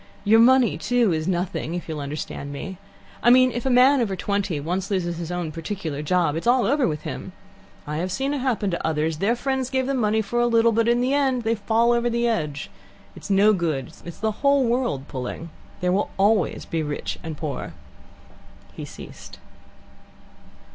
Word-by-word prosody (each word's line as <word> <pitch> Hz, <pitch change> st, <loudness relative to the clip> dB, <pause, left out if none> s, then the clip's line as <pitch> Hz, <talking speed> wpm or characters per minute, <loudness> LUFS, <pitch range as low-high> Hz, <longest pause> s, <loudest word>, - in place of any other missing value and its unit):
Your 220 Hz, +2 st, +5 dB
money, 255 Hz, +1 st, +5 dB
too, 240 Hz, -6 st, +2 dB
is 155 Hz, +1 st, -2 dB
nothing, 175 Hz, -3 st, -2 dB
if 175 Hz, -, -5 dB
you'll 155 Hz, -2 st, -4 dB
understand 145 Hz, 0 st, -5 dB
me. 185 Hz, +6 st, -7 dB, 0.4 s
I 240 Hz, -, +4 dB
mean 255 Hz, +1 st, +6 dB
if 245 Hz, +3 st, -3 dB
a -, -, +2 dB
man 255 Hz, +2 st, +5 dB
over 200 Hz, -5 st, -1 dB
twenty 200 Hz, -5 st, -1 dB
once 180 Hz, +6 st, -3 dB
loses 175 Hz, -4 st, -1 dB
his 170 Hz, 0 st, -5 dB
own 175 Hz, -3 st, -3 dB
particular 165 Hz, -2 st, -5 dB
job, 165 Hz, -1 st, +1 dB
it's 165 Hz, -, -3 dB
all 245 Hz, 0 st, +4 dB
over 285 Hz, -2 st, +2 dB
with 150 Hz, -2 st, -3 dB
him. -, -, -7 dB, 0.5 s
I 150 Hz, +1 st, -4 dB
have 180 Hz, +3 st, -2 dB
seen 270 Hz, +8 st, -1 dB
it 290 Hz, -, -2 dB
happen 235 Hz, -6 st, 0 dB
to 170 Hz, -, -3 dB
others. 155 Hz, 0 st, 0 dB
Their 220 Hz, +6 st, +2 dB
friends 265 Hz, 0 st, -2 dB
gave 260 Hz, -1 st, 0 dB
them 270 Hz, 0 st, -1 dB
money 220 Hz, -1 st, +1 dB
for 240 Hz, +4 st, -2 dB
a 240 Hz, -, +3 dB
little, 230 Hz, 0 st, +4 dB
but 230 Hz, +1 st, +1 dB
in 240 Hz, +1 st, +3 dB
the 255 Hz, +2 st, +1 dB
end 265 Hz, -4 st, +1 dB
they 225 Hz, 0 st, +1 dB
fall 230 Hz, +2 st, +2 dB
over 240 Hz, 0 st, +1 dB
the 235 Hz, 0 st, 0 dB
edge. 150 Hz, -10 st, -2 dB, 0.4 s
It's -, -, -10 dB
no 200 Hz, +2 st, +5 dB
good. 155 Hz, -9 st, -2 dB
It's 170 Hz, -, -9 dB
the 220 Hz, 0 st, -1 dB
whole 280 Hz, -1 st, +4 dB
world 235 Hz, -, -1 dB
pulling. 135 Hz, +5 st, -6 dB, 0.3 s
There 180 Hz, 0 st, +1 dB, 0.3 s
always 200 Hz, -2 st, +2 dB
will -, -, -24 dB
be 165 Hz, -, 0 dB
rich 150 Hz, -1 st, -4 dB
and 160 Hz, -2 st, -6 dB
poor." 145 Hz, -4 st, -5 dB, 1.0 s
He -, -, -7 dB
ceased. -, -, -11 dB
200 Hz, 195 wpm, -23 LUFS, 165-240 Hz, 1.0 s, mean